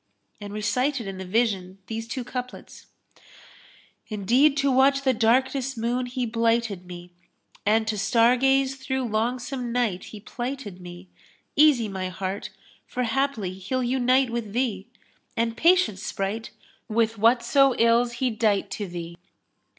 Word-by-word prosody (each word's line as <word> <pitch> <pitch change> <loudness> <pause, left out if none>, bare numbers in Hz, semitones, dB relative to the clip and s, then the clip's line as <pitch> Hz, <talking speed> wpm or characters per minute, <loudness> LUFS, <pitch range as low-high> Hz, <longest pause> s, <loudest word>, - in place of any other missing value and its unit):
and 205 -1 -8
recited 250 +5 -1
in 195 -1 -6
the 190 - -6
vision 190 -3 0
these 225 +2 -5
two 250 +2 -4
couplets, 250 0 -8 1.2
"Indeed 245 +8 +3
to 280 -1 +2
watch 275 +1 +4
the 260 -1 +3
darkness 260 +3 +1
moon 245 +2 -1
he 250 0 -2
blighted 230 -4 0
me, 175 0 -10 0.3
* - - -31
And 220 +1 +3
to 215 -2 -1
star 230 +4 +4
gaze 270 +1 +2
through 265 -1 -2
longsome 245 +3 -2
night 230 -7 -1
he 215 - -10
plighted 240 -4 -6
me: 175 +1 -11 0.5
Easy, 285 -6 +5
my 190 -2 -4
heart! 190 +2 -4 0.4
for 250 - -2
haply 240 -6 -1
he'll 200 +8 -3
unite 255 0 +2
with 230 -4 -4
thee; 220 -6 -1 0.2
* - - -39
And 230 0 0
patience, 335 - +3
Sprite! 210 +2 -3 0.4
with 225 -1 0
whatso 240 +4 +4
ills 235 +1 +3
he 250 +1 -1
dight 215 -2 0
to 205 - -4
thee." 170 -1 -7
230 Hz, 145 wpm, -25 LUFS, 205-255 Hz, 1.2 s, Easy